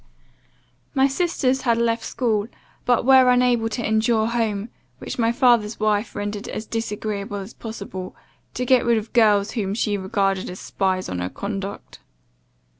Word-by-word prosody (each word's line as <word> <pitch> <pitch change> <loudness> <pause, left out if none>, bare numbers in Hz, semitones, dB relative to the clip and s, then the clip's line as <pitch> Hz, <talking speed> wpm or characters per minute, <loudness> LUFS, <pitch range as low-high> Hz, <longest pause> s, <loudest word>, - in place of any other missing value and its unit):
"My 270 0 +5
sisters 270 -4 0
had 235 -2 +2
left 230 0 +1
school, 220 -5 -1 0.4
but 245 -1 +2
were 260 -1 +7
unable 245 -2 +3
to 230 +1 -3
endure 220 +1 +2
home, 225 -2 -1 0.3
which - - -7
my 230 0 +3
father's 235 -3 +3
wife 215 0 0
rendered 205 0 -4
as 215 - -5
disagreeable 210 -2 -3
as 200 +3 -7
possible, 200 -5 -7 0.4
to 250 - -2
get 255 -1 +4
rid 235 -1 +3
of 220 0 -5
girls 210 -3 +4
whom 200 -4 -2
she 210 -2 0
regarded 195 -1 -1
as 180 - -8
spies 185 -1 -1
on 90 - -4
her 90 +1 -2
conduct. 200 - -6
220 Hz, 155 wpm, -22 LUFS, 205-240 Hz, 0.4 s, were